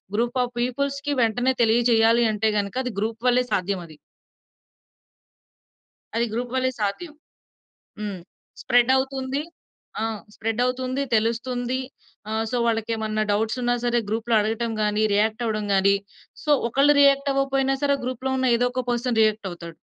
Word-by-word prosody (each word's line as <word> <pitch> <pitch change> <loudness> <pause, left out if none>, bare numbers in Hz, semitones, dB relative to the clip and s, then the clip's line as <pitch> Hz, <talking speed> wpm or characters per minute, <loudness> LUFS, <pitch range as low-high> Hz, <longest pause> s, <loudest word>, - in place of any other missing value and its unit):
Group 240 +3 0
of 245 0 -5
పీపుల్స్‌కి 280 +3 -1
వెంటనే 245 +3 +2
తెలియజేయాలి 230 0 +4
అంటే 215 +1 +1
గనుక 200 +3 -4
అది 250 -3 -4
గ్రూప్ 225 +2 -3
వల్లే 250 0 +4
సాధ్యమది. 180 -4 -2 2.2
అది 235 +1 +1
గ్రూప్ 245 +2 -3
వల్లే 260 0 +1
సాధ్యం. 255 - -3 0.9
హ్మ్. 205 -3 -4 0.4
స్ప్రెడ్ 245 +1 +3
అవుతుంది. 265 +1 -2 0.6
ఆ! - - 0 0.3
స్ప్రెడ్ 225 +1 -3
అవుతుంది, 255 +2 -2
తెలుస్తుంది. 245 +3 0 0.5
ఆ! - - -3 0.2
సో 250 - 0
వాళ్ళకేమన్నా 220 -1 -1
డౌట్స్ 220 +4 0
ఉన్న 245 0 +1
సరే 240 0 +2
గ్రూప్‌లో 225 +1 0
అడగటం 225 +2 -1
గాని, 210 0 +1
రియాక్ట్ 220 +3 +1
అవ్వడం 215 -2 -1
గాని, 200 +1 +4 0.5
సో 300 - +1 0.2
ఒకళ్ళు 285 +4 +4
రియాక్ట్ 275 0 +4
అవ్వకపోయినా 270 0 +1
సరే 280 0 +3
గ్రూప్‌లో 255 +1 -3
ఉన్న 260 - +1
ఏదో 245 - +2
ఒక 255 0 -1
పర్సన్ 240 -1 0
రియాక్ట్ 215 -2 +1
అవుతాడు. 170 -1 -9
240 Hz, 140 wpm, -24 LUFS, 220-260 Hz, 2.2 s, తెలియజేయాలి